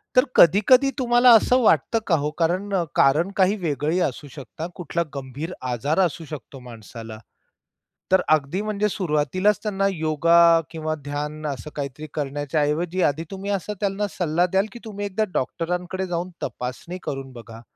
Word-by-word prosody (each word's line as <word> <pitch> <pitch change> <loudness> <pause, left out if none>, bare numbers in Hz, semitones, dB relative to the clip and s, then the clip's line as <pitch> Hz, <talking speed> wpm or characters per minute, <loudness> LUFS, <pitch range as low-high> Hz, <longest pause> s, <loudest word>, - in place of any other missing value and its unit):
तर 255 - +7
कधी-कधी 215 - +6
तुम्हाला 245 0 +5
असं 250 +3 +4
वाटतं 220 - +3
का 170 - +4
हो? 145 0 -1
कारण, 185 +5 0 0.2
कारण 155 +8 +3
काही 190 +1 +4
वेगळी 155 0 -1
असू 145 -2 -2
शकतं, 155 +3 -7
कुठला 170 0 -2
गंभीर 140 +5 -6 0.2
आजार 140 +8 -1
असू 170 -3 0
शकतो 145 -3 -9
माणसाला. 115 -2 -10 1.0
तर 190 - +6
अगदी 155 +4 +2
म्हणजे 210 -1 0
सुरुवातीलाच 185 +2 +1
त्यांना 195 -2 0
योगा 165 0 +4
किंवा 155 -1 -3
ध्यान 150 +1 -4
असं 145 +1 -5
काहीतरी 145 +1 -5
करण्याच्या 145 +1 -2
ऐवजी, 165 +5 0
आधी 155 +2 +1
तुम्ही 195 +1 -5
असं 200 +1 -2
त्यांना 200 0 -1
सल्ला 175 0 +1
द्याल, 190 +3 +1
की - - -9
तुम्ही 205 -2 -5
एकदा 200 +2 0
डॉक्टरांकडे 180 +6 -2
जाऊन 175 0 -3
तपासणी 130 - -5
करून 135 -1 -5
बघा. 115 -2 -11
165 Hz, 150 wpm, -23 LUFS, 145-195 Hz, 1.0 s, तर